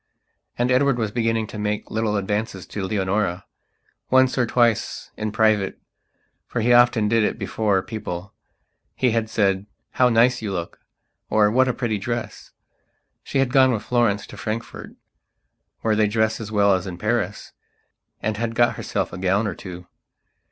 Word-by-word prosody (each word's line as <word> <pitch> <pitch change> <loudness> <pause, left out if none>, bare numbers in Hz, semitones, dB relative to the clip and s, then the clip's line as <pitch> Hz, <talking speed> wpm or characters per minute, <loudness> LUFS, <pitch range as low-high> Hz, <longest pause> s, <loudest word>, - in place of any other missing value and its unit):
And 120 +1 +1
Edward 135 0 +3
was 110 -3 -1
beginning 115 -1 0
to 105 0 -8
make 105 0 -3
little 110 -1 0
advances 105 -1 -2
to 100 - -5
Leonora. 95 -2 -1 0.6
Once 130 0 +4
or 125 -2 +1
twice, 115 -2 +1
in 110 0 -3
privatefor 110 -2 +2 0.8
he 120 +2 +3
often 120 -3 +5
did 115 +1 +3
it - - 0
before 100 -4 0
peoplehe 100 -4 -6 0.7
had 115 -3 +1
said: 100 -2 +1 0.2
"How 125 -1 +3
nice 120 +1 +3
you 105 -3 -3
look!" 85 -2 -5 0.5
or 105 -1 +3
"What 130 +3 +3
a 125 - +1
pretty 115 -5 -1
dress!" 120 +3 -5 0.7
She - - -3
had 135 -2 +1
gone 130 -1 +6
with 110 -4 -2
Florence 115 -5 +1
to - - -12
Frankfurt, 110 +2 -6 0.9
where 110 -1 +1
they 105 0 +3
dress 110 +1 0
as 110 0 -7
well 100 -2 +4
as 95 0 -1
in 90 -2 -6
Paris, 105 -1 -2 0.7
and 105 0 -1
had 115 0 -2
got 120 0 +3
herself - - -3
a 90 - -6
gown 95 +4 +1
or 100 - -2
two. 90 0 -9
110 Hz, 160 wpm, -23 LUFS, 100-120 Hz, 0.9 s, gone